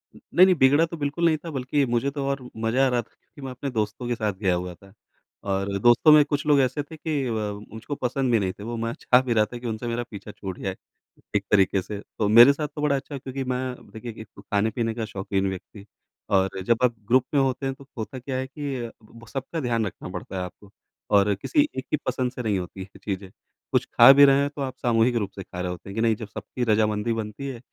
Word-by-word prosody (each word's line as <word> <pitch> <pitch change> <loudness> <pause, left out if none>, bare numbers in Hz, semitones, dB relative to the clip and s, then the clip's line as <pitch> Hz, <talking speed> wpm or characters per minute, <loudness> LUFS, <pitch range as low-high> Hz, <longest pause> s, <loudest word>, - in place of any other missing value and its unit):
नहीं, 175 +5 +4
नहीं 185 -1 +4
बिगड़ा 145 +2 +5
तो 170 0 -8
बिल्कुल 145 +3 -1
नहीं 160 -2 +4
था - - -4
बल्कि 135 +1 0
मुझे 120 +2 0
तो 140 -1 -3
और 140 -1 -2
म 125 - -10 0.2
मज़ा 125 +4 +3
आ - - +4
रहा 125 -1 +1
था 115 - -21
क्योंकि 145 - -19
मैं 135 -1 -5
अपने 125 +2 -5
दोस्तों 110 +1 -2
के 120 - 0
साथ 110 -3 -1
गया 95 -1 0
हुआ 90 0 -4
था। 100 +3 -18 0.6
और 100 +1 -1
दोस्तों 120 +8 +6
में 150 -1 +8
कुछ 145 0 -2
लोग 145 -2 +5
ऐसे 130 +3 0
थे 160 +2 -12
कि 150 -3 -2
अ, - - -2 0.4
मुझको 110 +6 -5
पसंद 130 0 -1
भी 115 - +4
नहीं 95 -2 -1
थे। - - -7
वो 120 +2 -4
मैं 115 +1 -2
चाह 125 0 +5
भी 130 -2 -1
रहा 110 -2 +4
था - - -4
कि 120 0 -6
उनसे 115 +1 -4
मेरा 120 +1 -1
पीछा 105 0 -8
छूट 95 -3 -7
जाए, 95 -1 -3 0.6
एक 100 -1 +1
तरीक़े 95 -1 +4
से। 100 +2 -6
तो 105 0 -3
मेरे 120 +6 +9
साथ 150 +1 -3
तो 150 - -4
बड़ा 150 -1 +2
अच्छा 140 +1 -5
हुआ - - -5
क्योंकि 135 0 -4
मैं 125 0 -2 0.2
देखिए 115 +1 -7
एक 110 - -10
तो - - -12
ख़ाने-पीने 110 +2 0
का 115 -1 -2
शौकीन 95 -2 -2
व्यक्ति 95 +2 -9 0.5
और 95 -1 +2
जब 115 +4 +3
आप 125 -1 +4
ग्रुप 130 +2 +4
में 140 - +4
होते 135 0 0
हैं 135 0 -2
तो 140 - -15
होता 115 +4 -5
क्या 130 +1 -5
है 130 0 -3
कि 135 -4 -4 0.4
सबका 140 +6 -4
ध्यान 120 -5 0
रखना 95 - -7
पड़ता 90 +1 -7
है - - -2
आपको 100 +2 -10 0.4
और 100 0 +5
किसी 295 - +1
एक 130 - -3
की - - +3
पसंद 130 -1 -1
से 125 - -6
नहीं 105 -4 +1
होती 90 +2 -8
है - - -5
ये - - -13
चीज़ें। 95 0 -8 0.4
कुछ - - +2
ख़ा 120 +3 +10
भी 140 +1 +8
रहे 135 0 +5
हैं 140 - 0
तो 145 - -5
आप 130 -2 -3
सामूहिक 120 0 +2
रूप 105 -4 0
से 95 - -6
ख़ा 90 - -9
रहे 90 0 -2
होते 90 +2 -9
हैं 100 - -8
कि 110 - 0
नहीं 115 -1 +3
जब 110 0 -8
सबकी 125 +4 -5
रज़ामंदी 105 +1 +2
बनती 110 +4 -5
है 130 -3 -6
120 Hz, 260 wpm, -25 LUFS, 105-135 Hz, 0.6 s, ख़ा